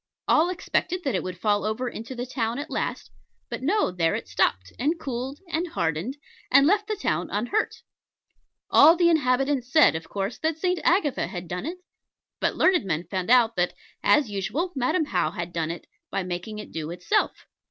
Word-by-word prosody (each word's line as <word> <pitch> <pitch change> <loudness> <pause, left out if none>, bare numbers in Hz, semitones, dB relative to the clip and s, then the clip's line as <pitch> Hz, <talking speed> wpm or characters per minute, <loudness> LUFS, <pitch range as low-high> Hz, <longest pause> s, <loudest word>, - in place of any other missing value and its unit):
All 325 +3 +4
expected 365 0 -1
that 270 - 0
it 185 - 0
would 185 -1 -6
fall 205 +2 +1
over 220 +4 -2
into 235 +2 -6
the 245 0 -4
town 235 -2 -2
at 295 +3 -6
last: - - -3 0.4
but - - -4
no, 365 - +1
there 165 -2 +1
it - - -5
stopped, 95 0 0
and 310 +6 0
cooled, 265 0 -4
and 340 +1 -1
hardened, 170 - -2 0.3
and 275 - +6
left 410 +5 +3
the 430 - -1
town 175 - -1
unhurt. 240 - -1 0.9
All 320 +3 +8
the 345 -1 +4
inhabitants 270 -3 +1
said, 310 0 +6
of 160 0 -6
course, 195 0 -3
that 315 0 -1
St. 360 +1 0
Agatha 335 -7 +2
had 175 -3 -6
done 180 - -4
it: 350 +3 -4 0.6
but - - 0
learned 365 -5 +3
men 170 -4 -1
found 185 0 -2
out 235 -2 +5
that, 180 0 +1 0.3
as 295 -4 +4
usual 295 - -2
Madam 280 +6 +1
How 175 - 0
had 175 0 -6
done 165 -2 -1
it, 170 - -6 0.2
by 195 - -2
making 180 +4 -5
it 210 - -8
do 160 -1 -4
itself. 175 +1 -1
245 Hz, 190 wpm, -25 LUFS, -, 0.9 s, All